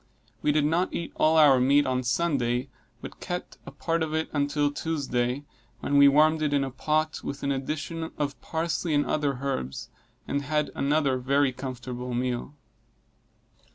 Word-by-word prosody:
We 150 Hz, -, +2 dB
did 150 Hz, 0 st, +2 dB
not 165 Hz, +4 st, +1 dB
eat 170 Hz, -, -4 dB
all 160 Hz, +1 st, +3 dB
our 145 Hz, -4 st, +7 dB
meat 140 Hz, +3 st, +4 dB
on 130 Hz, -1 st, 0 dB
Sunday, 125 Hz, -2 st, 0 dB, 0.3 s
but -, -, -9 dB
kept -, -, -5 dB, 0.2 s
part 165 Hz, 0 st, -1 dB
of 160 Hz, -1 st, -1 dB
it 160 Hz, 0 st, -1 dB
until 145 Hz, 0 st, +1 dB
Tuesday, 140 Hz, -4 st, -2 dB, 0.4 s
when 145 Hz, -, +1 dB
we 140 Hz, -, +9 dB
warmed 155 Hz, +3 st, +4 dB
it 150 Hz, -1 st, +1 dB
in 140 Hz, -1 st, +2 dB
a 135 Hz, -, -3 dB
pot, 155 Hz, +4 st, -1 dB
with 140 Hz, -, -5 dB
an 140 Hz, -, 0 dB
addition 155 Hz, +4 st, -3 dB
of 145 Hz, -1 st, -3 dB
parsley 160 Hz, -1 st, -1 dB
and 145 Hz, -, +2 dB
other 145 Hz, -3 st, 0 dB
herbs, 65 Hz, -, -3 dB, 0.4 s
and 140 Hz, -, -1 dB
had 150 Hz, +1 st, -1 dB
another 140 Hz, -2 st, +1 dB
very 140 Hz, +2 st, +2 dB
comfortable 125 Hz, -1 st, -5 dB
meal. 125 Hz, +3 st, -2 dB
145 Hz, 160 wpm, -27 LUFS, 130-155 Hz, 0.4 s, we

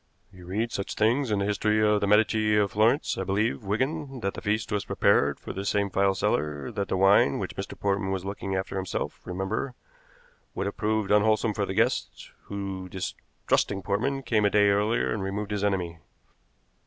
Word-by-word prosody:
You 90 Hz, -1 st, -13 dB
read 110 Hz, +5 st, -1 dB
such 100 Hz, -, -4 dB
things 120 Hz, +5 st, +2 dB
in 105 Hz, -, +1 dB
the 100 Hz, -, 0 dB
history 105 Hz, +1 st, +1 dB
of 105 Hz, 0 st, +2 dB
the 100 Hz, -, +1 dB
Medici 105 Hz, +1 st, +3 dB
of 100 Hz, -2 st, +2 dB
Florence. 115 Hz, +8 st, +2 dB
I -, -, -1 dB
believe, 105 Hz, +4 st, 0 dB
Wigan, 130 Hz, +6 st, -2 dB
that 100 Hz, -1 st, -1 dB
the -, -, -7 dB
feast 110 Hz, +1 st, -1 dB
was 105 Hz, -1 st, 0 dB
prepared -, -, +2 dB
for -, -, -7 dB
this 100 Hz, +1 st, -2 dB
same 100 Hz, -1 st, 0 dB
file 95 Hz, 0 st, +2 dB
seller, 75 Hz, -5 st, -1 dB
that 100 Hz, -1 st, -3 dB
the -, -, -1 dB
wine, 95 Hz, -7 st, +5 dB
which -, -, -4 dB
Mr. -, -, -6 dB
Portman 100 Hz, -1 st, 0 dB
was 95 Hz, -1 st, -2 dB
looking 100 Hz, -1 st, -4 dB
after 95 Hz, +1 st, -3 dB
himself, 95 Hz, -1 st, -4 dB
remember, 95 Hz, +8 st, -3 dB, 0.8 s
would -, -, -2 dB
have 100 Hz, -, -3 dB
proved 110 Hz, -1 st, 0 dB
unwholesome 110 Hz, +1 st, +3 dB
for 100 Hz, -1 st, -1 dB
the 95 Hz, -, -4 dB
guest, 115 Hz, +4 st, 0 dB
who, 95 Hz, -2 st, -5 dB
distrusting 95 Hz, +1 st, -2 dB
Portman, 135 Hz, +9 st, -1 dB
came 110 Hz, -4 st, +1 dB
a 105 Hz, -, +4 dB
day 105 Hz, 0 st, +4 dB
earlier 105 Hz, +3 st, +1 dB
and 110 Hz, -, -3 dB
removed 100 Hz, +2 st, -3 dB
his 105 Hz, -1 st, -2 dB
enemy." 90 Hz, -5 st, -1 dB
100 Hz, 190 wpm, -27 LUFS, 95-110 Hz, 0.8 s, wine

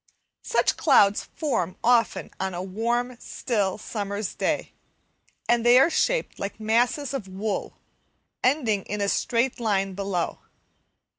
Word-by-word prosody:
Such -, -, +1 dB
clouds 205 Hz, -9 st, +4 dB
form 230 Hz, -, -1 dB
often 235 Hz, -1 st, +2 dB
on 185 Hz, 0 st, -4 dB
warm, 240 Hz, +3 st, -1 dB
still 205 Hz, -6 st, -2 dB
summer's 205 Hz, -1 st, -4 dB
day, -, -, -2 dB, 0.7 s
and 240 Hz, -1 st, +3 dB
they 240 Hz, +1 st, +7 dB
are 275 Hz, +6 st, +5 dB
shaped -, -, 0 dB
like 200 Hz, +2 st, -5 dB
masses 240 Hz, +6 st, +1 dB
of 250 Hz, -8 st, -4 dB
wool, 200 Hz, +3 st, -4 dB, 0.7 s
ending 245 Hz, -7 st, +2 dB
in 210 Hz, -, -4 dB
a 200 Hz, -, 0 dB
straight 240 Hz, +5 st, 0 dB
line 195 Hz, -4 st, 0 dB
below. 195 Hz, -3 st, -2 dB
220 Hz, 125 wpm, -25 LUFS, 200-245 Hz, 0.7 s, they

